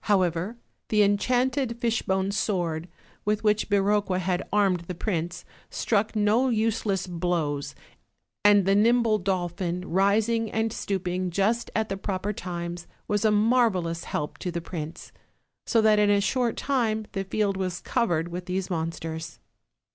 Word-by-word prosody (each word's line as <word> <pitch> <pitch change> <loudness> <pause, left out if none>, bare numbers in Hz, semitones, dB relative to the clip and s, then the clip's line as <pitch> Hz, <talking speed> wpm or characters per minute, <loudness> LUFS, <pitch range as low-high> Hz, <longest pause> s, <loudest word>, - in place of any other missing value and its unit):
However, 185 +1 +1 0.3
the 210 -1 +4
enchanted 245 +4 +1
fishbone 200 -5 0
sword, 175 -6 -1 0.4
with 210 +1 0
which 210 0 +2
Biroqua 200 -1 +2
had 185 0 0
armed 195 -3 +3
the 180 - -4
prince, 175 -2 -3 0.2
struck 215 0 0
no 215 +5 +3
useless 220 -4 0
blows; 165 -5 -2 0.7
and 205 -2 +6
the 195 - +3
nimble 225 +1 +4
dolphin, 180 -1 -2
rising 215 +4 +2
and 225 0 0
stooping 185 -3 -2
just 210 +6 0
at 220 0 +1
the 195 - -3
proper 195 +1 -2
times, 175 -2 -5 0.2
was 210 0 0
a 220 - +5
marvelous 210 -6 +2
help 150 0 -4
to 180 - -3
the 170 0 -3
prince; 165 -2 -7 0.6
so 230 - +3
that 215 -1 +5
in 210 0 +4
a 205 0 +4
short 235 +3 0
time 225 -6 0
the 195 - -2
field 200 +1 0
was 185 -2 -2
covered 175 -9 0
with 180 +1 -6
these 185 +1 -2
monsters. 160 -1 -4
195 Hz, 145 wpm, -26 LUFS, 175-215 Hz, 0.7 s, and